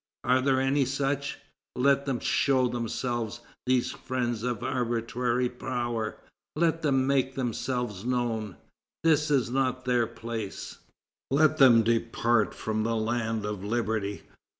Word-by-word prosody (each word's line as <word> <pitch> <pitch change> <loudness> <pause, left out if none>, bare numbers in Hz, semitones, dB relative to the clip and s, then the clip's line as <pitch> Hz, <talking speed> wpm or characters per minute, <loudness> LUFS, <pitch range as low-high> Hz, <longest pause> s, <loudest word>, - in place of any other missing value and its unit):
Are 130 +1 +3
there 130 0 +2
any 135 +2 +2
such? 135 +1 -1 0.4
Let 140 +2 +3
them 130 -3 0
show 130 -2 +2
themselves, 120 -1 -3 0.3
these 125 -1 +2
friends 120 -3 -2
of 120 -2 -2
arbitrary 120 0 0
power; 120 -3 -3 0.4
let 165 0 +1
them 135 -4 +2
make 135 -1 +1
themselves 125 -4 -2
known! 115 -5 -1 0.5
This 155 -1 +3
is 130 -4 +2
not 130 -1 0
their 120 -2 +2
place! 115 -3 -6 0.5
Let 155 +3 +3
them 120 -5 +7
depart 115 0 +1
from 110 0 -2
the 115 +1 0
land 110 -1 -1
of 105 -2 -4
liberty! 105 -2 -2
125 Hz, 125 wpm, -28 LUFS, 115-135 Hz, 0.5 s, them